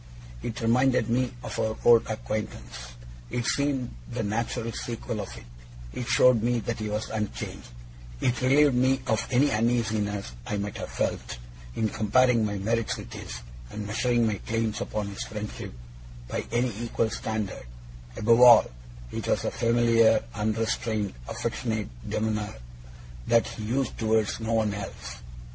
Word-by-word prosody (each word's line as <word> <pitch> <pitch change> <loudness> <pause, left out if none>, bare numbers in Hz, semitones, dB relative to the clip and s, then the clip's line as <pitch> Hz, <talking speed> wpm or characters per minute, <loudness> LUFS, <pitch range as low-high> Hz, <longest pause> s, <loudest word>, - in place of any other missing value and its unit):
It 120 0 -4
reminded 125 +2 +3
me 125 +1 +1
of - - -5
our 110 0 0
old 120 -1 +7
acquaintance; 110 - -5 0.4
it 120 -1 -2
seemed 140 -3 0 0.2
the 115 -2 -2
natural 115 +2 -2
sequel 115 -1 -4
of 100 - -4
it; - - -11 0.5
it 125 - -4
showed 120 -1 +5
me 120 +2 +2
that 115 +1 -3
he 110 -1 -3
was 105 +1 -3
unchanged; 105 -2 -4 0.5
it 125 0 0
relieved 140 +2 +5
me 130 +2 +3
of 115 -2 0
any 135 +3 +3
uneasiness 110 - 0 0.2
I 105 - -1
might 100 0 -3
have - - -5
felt, - - -2 0.4
in 110 - +1
comparing 115 +3 +3
my 105 -1 -1
merits 115 +3 0
with - - -9
his, - - -7 0.3
and 105 0 -5
measuring 120 +3 +2
my 105 -3 0
claims 115 -1 -1
upon 105 -1 -2
his 100 - -7
friendship 105 -1 -5 0.6
by - - -3
any 120 0 +1
equal 115 -1 0
standard; 110 - -3 0.5
above 115 +2 +4
all, 125 - +9 0.4
it - - -4
was - - +1
a - - 0
familiar, 115 -1 +4
unrestrained, 110 -1 -1 0.2
affectionate 110 -4 -2 0.2
demeanour 105 -1 -1 0.7
that 115 -1 +4
he 110 - -6
used 125 +3 -1
towards 110 -1 +1
no 115 0 -2
one 110 -2 +2
else. 100 -1 -7
115 Hz, 150 wpm, -27 LUFS, 105-120 Hz, 0.7 s, all